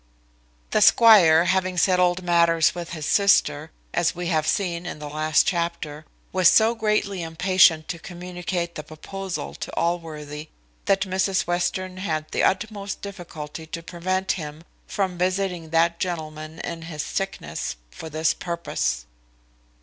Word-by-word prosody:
The 215 - +2
squire 190 -8 +7
having 185 -1 +1
settled 180 0 +3
matters 170 -2 +3
with 175 -1 -6
his 155 -3 -5
sister, 160 -7 +3 0.2
as 175 0 +1
we 175 0 -3
have 155 -2 +1
seen 175 -1 -1
in - - -5
the 150 0 -7
last 155 +1 +2
chapter, 170 -3 -2 0.3
was 185 -2 +6
so 225 +1 +5
greatly 210 -4 0
impatient 165 -1 +3
to 170 - -4
communicate 175 0 -5
the - - -5
proposal 185 +5 -6
to - - -7
Allworthy, 155 -3 -3 0.4
that 195 -1 +2
Mrs 190 0 +1
Western 185 +1 -2
had 155 -5 -3
the - - 0
utmost 200 0 -1
difficulty 165 -5 -8
to 165 +1 -6
prevent 185 +3 -2
him 155 -2 -6 0.2
from 185 -3 -2
visiting 180 -2 -1
that 165 +1 +2
gentleman 155 -3 -4
in 170 -1 -5
his 165 -2 -5
sickness, 80 - -4 0.2
for 160 - -9
this 160 +1 +1
purpose. 170 - -3
170 Hz, 140 wpm, -24 LUFS, 160-185 Hz, 0.4 s, squire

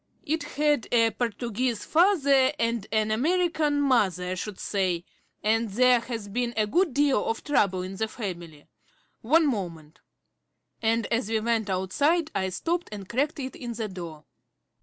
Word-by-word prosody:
It 315 +2 -1
had 295 -3 0
a 230 -1 +4
Portuguese 235 +1 -2
father 285 -7 +4
and 230 -3 -1
an 215 0 +1
American 310 +3 +1
mother, 195 - +2
I - - 0
should 190 +2 -6
say, 185 -4 -1 0.4
and 225 +1 +1
there 250 +4 +4
has 230 -3 -6
been 240 +3 -2
a 215 - +3
good 340 - +2
deal 280 -6 +3
of 225 - -2
trouble 195 -11 +1
in 190 +1 -7
the 220 - -1
family. 175 -9 -7 0.6
One 315 +8 +4
moment" 170 - -4 0.8
and 225 0 +1
as 230 -2 0
we 225 -1 +1
went 220 -1 0
outside 290 - +1
I 190 0 -1
stopped 335 - -2
and 200 -3 -7
cracked 285 +7 -1
it 260 -1 -5
in 240 -2 -6
the 225 -1 -3
door. 170 -5 -8
230 Hz, 160 wpm, -26 LUFS, 195-280 Hz, 0.8 s, a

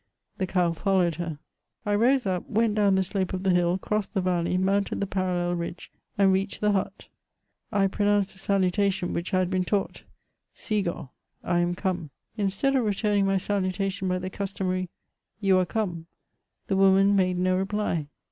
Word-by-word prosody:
The 190 - 0
cow 180 -2 +1
followed 180 0 +1
her. 165 -3 -4 0.5
I 205 - 0
rose 245 +4 +3
up, 185 -2 -2
went 225 0 +2
down 205 -2 +3
the 190 - +2
slope 190 0 -2
of 185 0 -3
the 190 - +3
hill, 175 0 +2
crossed 210 +2 -2
the 190 - +2
valley, 180 -1 0
mounted 195 +2 0
the 200 - 0
parallel 180 -2 -1
ridge, 170 0 -5 0.3
and 195 -1 +4
reached 195 +2 -1
the 210 0 +2
hut. 195 -2 -2 0.7
I 200 -3 +2
pronounced 205 0 +1
the 190 - -12
salutation, 195 -1 +1
which 170 +3 -3
I 185 - +2
had 185 0 +1
heen 185 -1 +1
taught: 200 +1 -2 0.5
'^si^^oA'' 190 - -2 0.3
(I 175 0 +1
am 175 0 0
come); 180 -4 -2 0.3
instead 205 +6 0
of 260 - +3
returning 205 -1 +1
my 195 0 +2
salutation 195 0 -1
hy 180 - +1
the 185 +1 -5
cus 195 0 -4
tomary 185 -1 -1 0.5
"yow 195 -3 +3
are 180 - +1
come,'' 175 -6 -3 0.6
the 195 - 0
woman 195 +1 +5
made 185 -2 +2
no 185 +1 +2
reply. 190 -5 -1
190 Hz, 180 wpm, -26 LUFS, 180-200 Hz, 0.7 s, woman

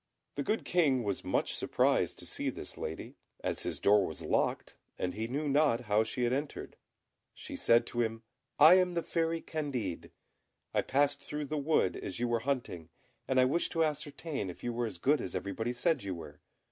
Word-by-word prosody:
The 145 - -3
good 215 +10 -1
King 145 -8 +2
was 100 -3 -2
much - - 0
surprised - - +1
to - - -6
see - - -2
this - - -4
lady, 80 - -6 0.3
as - - -1
his - - -3
door 100 0 +5
was 80 - -6
locked, - - 0 0.2
and 90 0 -2
he 110 +2 -3
knew 145 +5 -2
not 140 -4 +3
how 105 -1 +2
she 125 +3 -3
had 120 +1 +2
entered. 140 +2 -4 0.6
She - - -8
said 115 0 +4
to 120 - -2
him, 115 0 -2 0.3
"I 160 +5 +9
am 180 -1 +1
the 170 - 0
Fairy 165 -1 -1
Candid; 130 - -4 0.6
I - - +3
passed 145 +1 +1
through 150 0 -4
the 155 +2 -3
wood 145 - +2
as 95 - -5
you 120 - +1
were 120 -1 +1
hunting, 115 - -3 0.4
and 130 -1 +2
I 130 - +6
wished 150 +7 +1
to 165 -1 +3
ascertain 150 - -3
if 90 - -10
you 120 - -2
were 120 0 -1
as 100 - -7
good 145 - +2
as - - -5
everybody 110 +4 -2
said 135 +4 +1
you 95 -2 -4
were. 75 -3 -10
130 Hz, 200 wpm, -32 LUFS, 110-150 Hz, 0.6 s, I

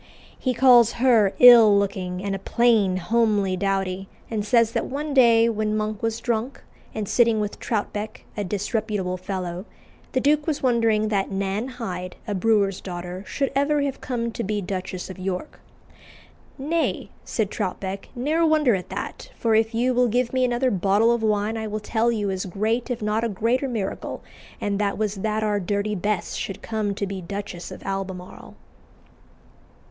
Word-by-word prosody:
He 255 -2 -1
calls 240 -2 +6
her 230 -5 +3
"ill 230 -4 +9
looking" 190 -2 -2
and 200 -1 -2
"a 195 - -3
plain, 215 -4 +2
homely 205 0 +1
dowdy," 195 0 -2 0.2
and 215 -2 -1
says 230 +1 +3
that 230 -1 -1
one 290 +2 -4
day, 230 -3 +6
when 215 -1 0
Monk 215 -1 -3
was 225 0 -1
drunk, 235 +2 -2 0.3
and 215 -2 -4
sitting 230 -1 +3
with 210 -1 -3
Troutbeck, 215 -1 -3
a 205 - -2
disreputable 205 -1 -2
fellow, 185 -1 -4 0.5
the 260 - +2
duke 295 +3 +2
was 300 -4 -1
wondering 225 -4 +2
that 200 -2 0
Nan 195 +4 -2
Hyde, 185 -8 -6
a 210 - -1
brewer's 200 -1 +1
daughter, 180 0 -6
should 275 -1 -1
ever 285 +1 +2
have 275 -1 -3
come 235 -2 -2
to 230 - -4
be 210 +1 -1
Duchess 185 -1 -4
of 185 - -11
York. 185 +8 -4 1.0
"Nay," 320 +4 -1
said 215 -4 -2
Troutbeck, 190 +1 -4
"ne'er 300 +7 +1
wonder 310 -6 +4
at 185 -2 -3
that, - - -6
for 225 -1 0
if 220 +1 +2
you 250 +2 +2
will 250 0 +3
give 245 +2 0
me 255 0 +2
another 250 +1 +1
bottle 200 +4 +3
of 235 -1 +1
wine 215 0 0
I 220 0 -3
will 215 0 -3
tell 225 +2 +1
you 205 -4 -1
as 190 0 -3
great 220 +7 -1
if 240 -3 -3
not 210 +2 0
a 235 - 0
greater 230 +7 0
miracle, 215 -6 -4 0.4
and 200 -1 -1
that 205 -1 0
was 215 -2 -1
that 215 +2 -1
our 210 -1 +1
Dirty 200 +2 -1
Bess 205 -1 -2
should 195 - -5
come 215 -3 -2
to 200 - -2
be 195 -1 -5
Duchess 195 -1 -6
of - - -10
Albemarle." 190 -2 -6
215 Hz, 175 wpm, -24 LUFS, 195-235 Hz, 1.0 s, ill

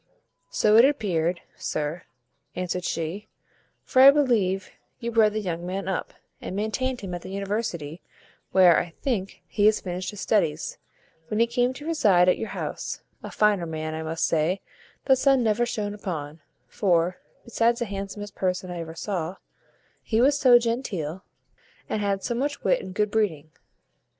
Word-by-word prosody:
"So 215 0 +4
it 235 - +9
appeared, 180 - 0
sir," 150 +3 -3 0.5
answered 180 0 -3
she; 170 +6 -3 0.6
"for 260 - +3
I 270 - +11
believe 220 -10 +2 0.3
you 235 -1 -3
bred 220 -2 +4
the 215 - -1
young 175 -3 -3
man 190 +2 -4
up, 190 - -3 0.3
and - - -5
maintained 240 +5 -2
him 190 -3 -6
at 175 - -4
the 185 - -9
university; 195 -5 -3 0.5
where, 180 -3 +6
I 170 -2 -5
think, 205 -8 -2
he 210 -1 +2
had 215 - +5
finished 180 -1 -4
his 205 - -8
studies, 155 -9 0 0.5
when 215 - -2
he 230 - +6
came 245 +1 +1
to 290 +3 -10
reside 205 - +4
at 180 - +3
your 225 - -4
house; - - -5 0.2
a - - -7
finer 205 -5 +2
man, 155 0 -4
I 160 - -4
must 160 +1 -1
say, 165 +4 +1 0.4
the 265 - +6
sun 265 -1 +3
never 225 +2 +2
shone 210 -3 -3
upon; 160 -7 -6 0.2
for, 180 -2 +1 0.3
besides 235 0 +2
the 240 - -1
handsomest 200 0 -6
person 185 -1 -2
I 175 - -5
ever 165 -1 -7
saw, 180 -1 -3 0.7
he 220 - 0
was 275 +4 +5
so 255 -4 +7
genteel, 200 - -2 0.6
and 215 - -2
had 200 -1 -1
so 240 - -1
much 280 +4 -2
wit - - +2
and 185 - -9
good 210 0 +1
breeding." 165 -9 -1
195 Hz, 170 wpm, -25 LUFS, 175-230 Hz, 0.7 s, I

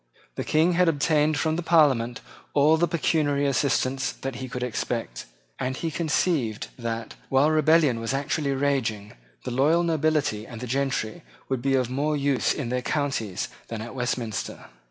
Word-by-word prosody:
The - - -4
King 160 +3 +3
had 180 0 +4
obtained 150 0 +2
from 160 +2 0
the - - -1
Parliament 140 -8 +3 0.3
all 150 +2 +5
the 170 +2 +2
pecuniary 150 -3 +1
assistance 135 -1 +1
that 135 -2 -6
he 130 0 -6
could 125 +1 -4
expect; 115 - -3 0.3
and 130 +1 -2
he 165 - -2
conceived 150 - 0
that, 115 -1 -4 0.2
while 135 +3 +4
rebellion 155 -5 +4
was 115 +2 -2
actually 140 +1 -1
raging, 130 -7 -1 0.3
the 125 - -4
loyal 150 +7 +3
nobility 155 -9 0
and 120 +1 -7
gentry 130 -4 -1 0.3
would 130 -2 -1
be 135 +1 +2
of 125 -2 0
more 150 +3 0
use 140 -2 +1
in 130 -5 -3
their 125 +1 -1
counties 130 -9 -2 0.2
than 110 -2 -5
at 120 - -8
Westminster. 120 -3 -3
135 Hz, 160 wpm, -25 LUFS, 120-155 Hz, 0.3 s, all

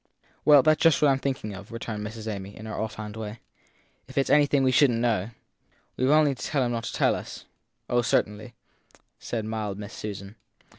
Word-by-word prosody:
Well, 145 -3 +7
that 155 -1 +4
s - - -11
just 165 -4 +5
what 145 - +6
I - - +5
m 135 - +1
thinking 130 -7 -3
of, 100 +3 -10
returned 110 -2 -5
Miss 110 +1 -7
Amy 100 -2 -6
in 110 - -9
her 110 - -6
offhand 110 -1 -5
way. 110 0 -6 0.7
If 130 - -13
it - - +6
s - - -3
anything 145 -2 +4
we 130 - +3
shouldn 130 -1 +4
t 115 - -1
know 115 -4 +1 0.7
We 130 - 0
ve - - +2
only 150 -1 +5
to 130 - -9
tell 140 -4 0
him 120 - -1
not 115 -1 -3
to - - -5
tell - - +3
us? - - -7 0.4
Oh, 120 0 +2
certainly, 110 +1 -1 0.6
said 115 -3 -4
mild 110 -3 -3
Miss 105 -1 -8
Susan. 100 0 -7
115 Hz, 225 wpm, -26 LUFS, 105-135 Hz, 0.7 s, Well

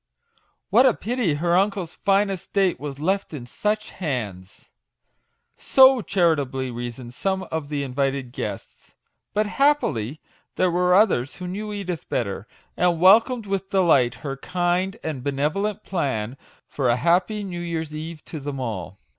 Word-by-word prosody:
What 260 - +6
a 245 - +3
pity 230 - -1
her 170 +3 +1
uncle's 190 -3 +1
fine 195 0 +2
estate 190 0 0
was 140 -1 -6
left 190 +1 -1
in 125 -4 -7
such 210 - -2
hands 105 - -5
I" - - -39
So 265 -2 +6
charitably 145 -10 0
reasoned 120 0 -6
some 190 +6 -1
of 160 -3 -3
the 145 -1 -2
invited 135 -1 -2
guests; - - -7 0.4
but, 215 +1 +2
happily, 205 - +1 0.4
there 185 -1 +2
were 180 +1 +3
others 185 - +3
who 180 - -7
knew 210 +4 -4
Edith 185 -5 -5
better, 100 +1 -2 0.3
and 175 -2 +2
welcomed 225 +6 +5
with 195 -1 -3
delight 160 - +3
her 135 -1 -3
kind 180 +4 -1
and 145 -6 -4
benevolent 150 +9 -1
plan 130 - -2 0.3
for 135 -4 -1
a 120 - +4
happy 180 - +1
new 175 -3 -5
year's 160 -3 -4
eve 155 +1 -7
to 155 - -6
them 140 -1 -5
all. 100 -6 -5
170 Hz, 150 wpm, -23 LUFS, 135-195 Hz, 0.4 s, What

